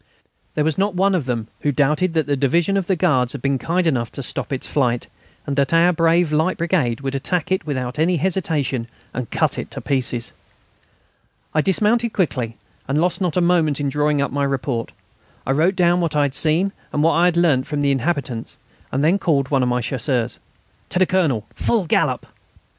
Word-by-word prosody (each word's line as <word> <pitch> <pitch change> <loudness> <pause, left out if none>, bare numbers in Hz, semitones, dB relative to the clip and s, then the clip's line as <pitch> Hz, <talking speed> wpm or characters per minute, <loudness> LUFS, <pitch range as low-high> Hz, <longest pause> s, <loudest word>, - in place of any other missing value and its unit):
There 150 - +1
was 160 +3 0
not 200 -1 +1
one 195 +2 +3
of 175 -8 0
them 115 -3 -2
who 145 - +1
doubted 150 +5 +1
that 160 -2 +2
the 145 - 0
Division 165 +8 +1
of 195 -3 0
the 190 - +2
Guards 130 -9 +2
had - - -6
been 135 -1 +1
kind 175 +5 0
enough 125 -8 0
to 140 - -5
stop - - -4
its 135 - -3
flight, 125 -4 0 0.4
and 140 - -2
that 140 +3 +2
our 175 +2 +5
brave 165 0 +2
light 160 +4 +1
brigade 155 -9 0
would 135 0 -3
attack 160 +6 -2
it 190 -3 0
without 130 -1 -3
any 170 +2 +2
hesitation 155 -8 -1 0.3
and 125 -3 -4
cut - - 0
it - - -6
to - - -6
pieces. 125 -3 -1 1.2
I 155 - +3
dismounted 215 +6 +1
quickly, 125 - -1 0.3
and 140 +3 +1
lost 180 +4 0
not 180 -2 0
a - - +3
moment 165 -5 +2
in 145 -1 0
drawing 150 0 +1
up - - -3
my 140 +1 -1
report. 135 -3 -2 0.5
I - - 0
wrote 165 +7 +2
down 175 -1 +3
what 165 -3 -1
I 145 - +3
had 140 -2 -1
seen 165 +7 +1 0.2
and 150 - 0
what 165 - +4
I 170 - +3
had 175 -1 +2
learnt 150 -7 +3
from 150 -1 -2
the 140 -1 +2
inhabitants 135 -4 -2 0.3
and 135 +2 0
then 175 +6 +3
called 140 -7 +1
one 135 -2 +3
of 125 - +1
my 125 0 0
Chasseurs: 125 -1 -2 0.5
"To - - -2
the 185 - +5
Colonel, 155 - +1
full 220 -6 0
gallop!" - - +1
150 Hz, 210 wpm, -21 LUFS, 135-175 Hz, 1.2 s, our